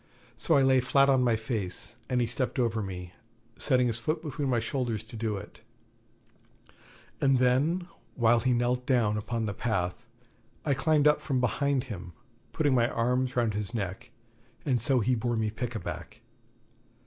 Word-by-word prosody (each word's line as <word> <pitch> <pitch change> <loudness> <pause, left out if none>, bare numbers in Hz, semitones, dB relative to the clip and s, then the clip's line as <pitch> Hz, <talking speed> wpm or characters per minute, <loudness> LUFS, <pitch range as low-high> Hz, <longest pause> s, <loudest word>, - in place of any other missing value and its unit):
So - - +2
I 140 - +5
lay 130 0 +5
flat 135 +2 +3
on 130 -2 +4
my 120 -2 +3
face, 110 -1 -4
and 125 -1 +1
he - - +2
stepped 120 +2 -1
over 115 -3 +1
me, 90 -2 -6 0.4
setting 125 -3 +2
his 120 -1 0
foot 155 +7 -2
between 145 -2 -3
my 120 -2 +2
shoulders 115 -2 -2
to 115 +1 -12
do 110 -2 -2
it; 100 +2 -11 1.6
and 135 -1 +4
then, 140 +9 +2 0.3
while 120 -1 +4
he 125 +2 +1
knelt 125 +1 0
down 115 -5 +2
upon 110 +2 -2
the 100 - -2
path, 110 0 -2 0.6
I 145 - +2
climbed 150 +2 +3
up 150 - +4
from 135 -4 -1
behind 135 +1 +1
upon 130 - -10
him, 90 -2 -9 0.4
putting 145 -4 +1
my 120 -1 +3
arms 125 +2 0
round 120 -3 +1
his 105 +3 -3
neck; 100 +3 -4 0.6
and 125 -6 +1
so 130 +1 +3
he 125 +4 +2
bore 120 0 0
me 110 -1 0
'pickaback'. 115 0 -6
120 Hz, 170 wpm, -28 LUFS, 110-130 Hz, 1.6 s, I